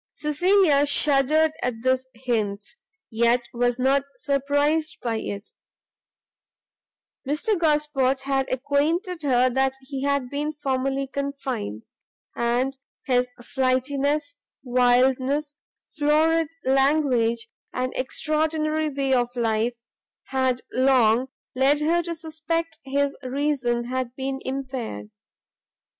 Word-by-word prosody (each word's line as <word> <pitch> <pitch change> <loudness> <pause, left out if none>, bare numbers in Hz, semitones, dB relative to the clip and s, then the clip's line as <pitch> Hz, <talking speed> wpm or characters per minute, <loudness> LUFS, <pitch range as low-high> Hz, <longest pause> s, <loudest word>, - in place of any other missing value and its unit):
Cecilia 300 -1 +3
shuddered 295 +2 +3
at 235 -2 -3
this 260 0 +1
hint, 220 -5 -2 0.5
yet 235 +2 +3
was 245 0 +1
not 265 +2 +3 0.2
surprised 285 +3 0
by 230 -2 -2
it; 200 -1 -6 1.8
Mr 305 +10 +1
Gosport 295 -5 +1
had 270 -1 -1
acquainted 315 - 0
her 255 -3 +3 0.3
he 265 0 -6
had 280 -2 0
been 295 +2 -2
formerly 275 -1 -1
confined; 270 - -4 0.5
and 245 +3 0 0.3
his 250 -1 +2
flightiness, 280 +3 0 0.3
wildness, 255 +3 +2 0.4
florid 315 +2 +3 0.2
language, 265 -4 +2 0.2
and 255 0 -2
extraordinary 310 +3 0
way 275 -1 0
of 245 -1 +2
life, 230 0 0 0.6
bad 260 -2 0
long 255 -2 +3 0.3
led 270 +3 +3
her 330 +3 +2
to 340 0 -5
suspect 325 +1 -3
his 280 +1 0
reason 255 -3 0
had 255 0 -3
been 270 0 -3
impaired. 255 - -5
270 Hz, 100 wpm, -24 LUFS, 250-295 Hz, 1.8 s, Cecilia